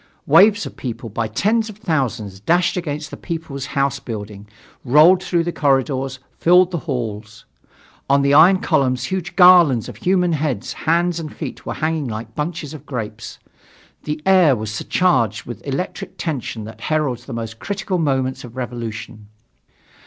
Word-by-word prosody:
Waves 205 0 +5
of - - -8
people 120 -2 -6
by 110 +2 -2
tens 215 - 0
of 210 - -10
thousands 125 - -2
dashed 175 - +1
against 155 -4 -4
the - - -7
People's 160 -6 -5
House 140 0 +1
building, 105 -2 -7 0.4
rolled 155 +8 +6
through 175 -3 0
the 175 - -2
corridors, 135 -2 0 0.2
filled 180 +1 +5
the 170 - -2
halls. 110 -4 -5 0.6
On 140 0 +4
the 140 0 +3
iron 185 +6 +6
columns 130 -2 +1
huge 180 +4 -4
garlands 175 - +6
of - - -9
human 180 -2 +1
heads, 145 -8 -2
feet - - -12 0.3
and 155 -2 -5
hands - - -7
were - - -3
hanging 155 -2 -1
like 110 0 -6
bunches 155 +1 -4
of 155 - -11
grapes. 115 -4 -6 0.7
The 150 +1 -3
air 185 -7 +5
was 110 -2 -5
surcharged 120 - +1
with 120 - -7
the - - -8
electric 180 +7 -4
tension 130 -8 -4
that 110 +1 -10
heralds 135 -6 -1
the 130 - -8
most 115 -1 -6
critical 200 -2 -3
moments 130 -4 -1
of 120 0 -11
revolution. 115 -3 -6
140 Hz, 160 wpm, -20 LUFS, 115-175 Hz, 0.7 s, rolled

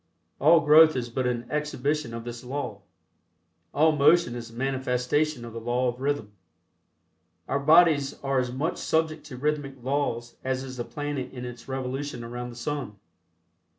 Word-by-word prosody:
All 160 +3 +6
growth 155 0 +7
is 120 -2 -3
but 130 +1 -1
an 120 -1 -2
exhibition 150 -2 -1
of 115 - -6
this 120 0 -7
law. 125 -6 -4 0.9
All 155 +2 +4
motion 150 -2 +4
is 120 -1 -6
a - - -16
manifestation 130 +1 0
of 115 - -9
the 115 - -5
law 120 +2 +1
of 120 +1 -7
rhythm. 140 -7 -1 1.2
Our 140 - 0
bodies 155 -2 +5
are 135 -1 +1
as 125 -1 -1
much 145 +7 -2
subject 160 -1 0
to 130 -4 -8
rhythmic 145 0 -1
laws 130 -3 -2
as 130 0 -1
is 130 -1 -8
the 120 - -3
planet 145 -3 -4
in 125 -1 -7
its 120 -1 -9
revolution 135 0 -4
around 120 +1 -6
the 120 - -10
sun. 125 -2 -4
135 Hz, 165 wpm, -26 LUFS, 120-150 Hz, 1.2 s, growth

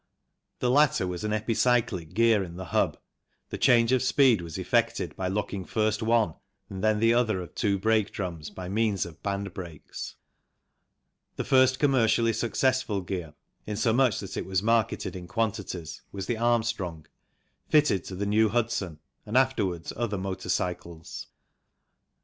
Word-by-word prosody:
The 125 - +2
latter 145 -7 +4
was 90 -1 -4
an 105 - -1
epicyclic 110 -5 0
gear 115 -2 +4
in 85 -2 -8
the 95 +1 -6
hub, - - +2 0.5
the - - -3
change 115 -1 +4
of 130 -1 +3
speed 130 -5 +4
was 85 -2 -7
effected - - 0
by 95 - -2
locking 100 0 -2
first 110 +3 0
one 110 -6 +2 0.4
and 95 0 -6
then 110 -1 +3
the 115 +1 +4
other 115 -5 +2
of 90 - -8
two 100 -4 +1
brake 110 +1 +2
drums 85 -6 -5
by 90 -1 -8
means 105 -1 0
of 80 -2 -12
band 100 -1 -3
brakes. 85 -6 -8 1.2
The - - -2
first 130 0 +4
commercially 115 -5 +3
successful 120 -3 0
gear, 90 -5 -5 0.3
in 105 -1 -3
so 110 +1 +2
much 125 -4 +3
that 100 -1 -7
it - - -4
was 95 0 0
marketed 115 -3 +1
in 90 -1 -7
quantities, 90 -5 -3
was 95 -1 -5
the 120 - -1
Armstrong, 110 -8 0 0.6
fitted 130 - +3
to 95 - -6
the 100 +2 -2
New 110 +2 +3
Hudson 110 -7 -1 0.3
and 110 +4 +1
afterwards 105 -11 +1
other 110 -3 -2
motor 95 -1 -5
cycles. 85 -2 -3
105 Hz, 160 wpm, -27 LUFS, 95-115 Hz, 1.2 s, latter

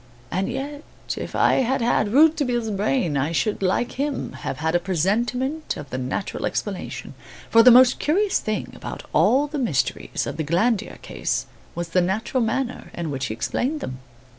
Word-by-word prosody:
And 190 +3 -1
yet, 285 +2 -5 0.3
if - - -6
I - - +4
had 265 +1 +1
had 230 -3 +2
Rouletabille's 265 -5 +3
brain, 200 - 0
I 140 +4 0
should, 205 +6 0
like 195 +6 +1
him, 285 -1 -2
have 135 - -5
had 160 +3 -1
a 175 - +4
presentiment 235 - -1
of 145 -1 -9
the 130 - -2
natural 130 +10 -3
explanation; 200 -3 -4 0.4
for 230 - +8
the 250 - +8
most 250 +1 +7
curious 385 +6 +2
thing 215 -1 -3
about - - -7
all 275 +3 +4
the 295 0 -4
mysteries 200 - -1
of - - -5
the 160 - -1
Glandier 195 +9 0
case - - -2 0.3
was 175 -1 -4
the 180 +2 +3
natural 215 +8 0
manner 245 +3 -2
in 165 -3 -3
which 135 -1 -2
he 110 - -4
explained 240 - -1
them. 130 - -6
220 Hz, 175 wpm, -23 LUFS, 170-265 Hz, 0.4 s, for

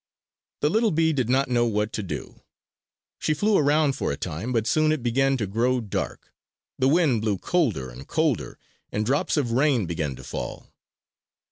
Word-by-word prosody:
The 150 - +3
little 225 +2 +3
bee 160 -1 +2
did 130 -5 -1
not 135 +2 +3
know 120 -2 +2
what 105 -1 -1
to - - -2
do. 95 - -7 0.8
She 155 - 0
flew 205 +5 +2
around 145 -1 +3
for - - -2
a 70 - -3
time; 90 +8 -4
but 115 -3 +1
soon 155 +7 +3
it 155 -6 -1
began 135 +3 +2
to 110 - -1
grow 120 +6 +1
dark; 105 -5 -5 0.5
the 130 - +3
wind 145 -7 +3
blew 105 -3 0
colder 105 - 0
and 65 +3 -11
colder, 155 -7 0 0.3
and 105 +1 -1
drops 140 +6 +1
of 130 -6 0
rain 130 -3 +2
began 80 -5 -3
to - - -12
fall. - - -6
125 Hz, 180 wpm, -25 LUFS, 105-150 Hz, 0.8 s, The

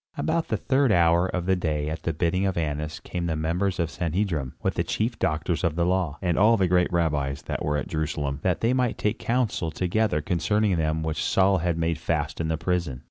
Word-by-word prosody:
About 165 +1 0
the - - 0
third 135 -2 +2
hour 85 -1 +4
of 90 -2 -3
the 95 0 +3
day 75 -4 -1
at 80 +1 -4
the 85 - -1
bidding 85 +4 0
of 95 - -2
Annas 75 -1 -2
came 85 -1 -4
the 80 - -1
members 85 +5 -1
of 85 -2 0
the - - -13
Sanhedrim, 85 -6 -2
with - - +1
the - - 0
chief 115 +2 -2
doctors 80 +3 -1
of 85 -3 +1
the 85 0 +1
law, 90 -4 0
and 90 -2 +1
all 115 +3 +5
the 95 -2 +2
great 90 0 +2
rabbis 75 -5 0
that - - -4
were 75 0 0
at - - -3
Jerusalem, 75 -3 -2
that 90 -2 0
they 115 +2 +2
might 125 -2 0
take 105 +1 -1
council 115 -8 0
together 90 +2 0
concerning 95 +5 +1
them 80 -1 0
which 80 -1 -2
Saul 95 0 +3
had 85 0 0
made 80 0 0
fast 80 -1 -2
in 80 - -1
the 80 0 -1
prison. 85 -6 -1
85 Hz, 230 wpm, -25 LUFS, 80-95 Hz, -, all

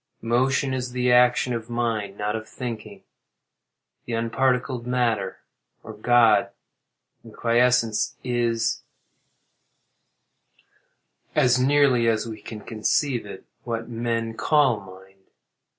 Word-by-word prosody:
Motion 130 +3 +1
is 125 -1 -3
the 125 0 +1
action 125 0 +4
of 115 0 -5
mind, 115 -4 -2
not 105 +1 -2
of 110 0 -6
thinking. 110 -5 -7 1.0
The 120 - -5
unparticled 125 +2 0
matter, 115 -6 -1 0.4
or 110 - -9
God, 115 -1 +4 0.7
in 115 -2 -14
quiescence, 115 -1 +2
is 120 -2 0 2.5
(as 125 0 +4
nearly 130 -3 +3
as 110 0 +1
we 110 -2 -8
can 105 0 -8
conceive 120 +2 -1
it) 100 - -10 0.2
what 115 -1 -4
men 115 -1 -2
call 130 0 +2
mind. 95 0 -15
115 Hz, 105 wpm, -24 LUFS, 110-125 Hz, 2.5 s, action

